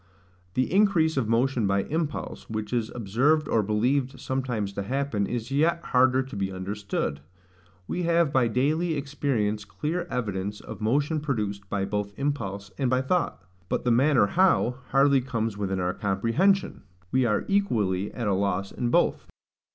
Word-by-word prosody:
The 130 +6 0
increase 185 -6 +3
of 125 -5 0
motion 120 -1 +2
by 100 0 +1
impulse, 160 -1 -4
which 110 +1 -4
is 115 -3 0
observed 130 +8 +2
or 115 - +2
believed 125 +6 0
sometimes 125 -7 -2
to 100 - -3
happen, 125 -2 -1
is 120 +1 -4
yet 160 +5 +2
harder 130 +1 +3
to 130 -4 -10
be 95 -1 -2
understood. 95 -5 -3 0.7
We 180 - -2
have 170 -3 +2
by 130 -3 +4
daily 155 +8 +1
experience 135 -8 -1
clear 165 +11 -3
evidence 105 -3 -3
of - - -9
motion 145 +8 +1
produced 105 -9 -3
both 100 0 -1
by - - -15
impulse 100 -9 -3
and 130 - +1
by 130 0 +2
thought; 170 - -1 0.3
but - - -1
the 125 - +2
manner 130 -1 +4
how, 145 - +2
hardly 140 0 +4
comes 115 -4 -2
within 95 -2 -2
our 90 0 0
comprehension: 115 - +1 0.3
we 130 -1 +3
are 105 -3 +1
equally 105 - +1
at 120 - -4
a 100 - +2
loss 100 0 -1
in 120 - -2
both. - - +1
120 Hz, 160 wpm, -26 LUFS, 105-145 Hz, 0.7 s, by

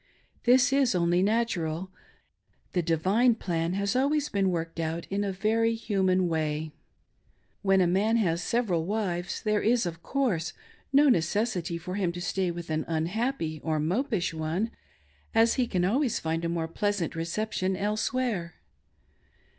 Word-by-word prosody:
This 260 +3 +5
is 270 -6 +3
only 175 0 +2
natural. 190 -5 0 0.8
The 180 - +2
"divine" 190 +9 +3
plan 170 -5 -2
has 200 +2 -1
always 290 +3 +1
been 195 -2 +1
Worked 165 -1 -3
out 165 +1 -2
in 200 +1 0
a 200 - -1
very 225 +4 +1
human 190 -5 +1
way. 155 -1 -1 0.9
When 195 -1 +3
a - - +4
man 200 +6 +2
has 170 -6 +1
several 185 -9 0
wives, 190 -4 -2
there 215 -1 +1
iS, 230 0 +2
of 165 -1 -5
course, 185 - -1 0.4
no 285 +2 +6
necessity 180 - +1
for 180 +2 -6
him 185 -4 0
to 175 - -6
stay 180 +1 -1
with 170 -1 -6
an 155 0 0
unhappy 165 - -2
or 155 -1 0
mopish 185 - 0
one, 165 +8 -2 0.6
as 230 +1 +5
he 250 -2 +1
can 180 -4 0
always 250 +5 +1
find 165 +1 -2
a 170 - 0
more 165 -1 -1
pleasant 200 0 -1
reception 185 +2 -2
elsewhere. 210 -3 -1
185 Hz, 150 wpm, -28 LUFS, 170-225 Hz, 0.9 s, no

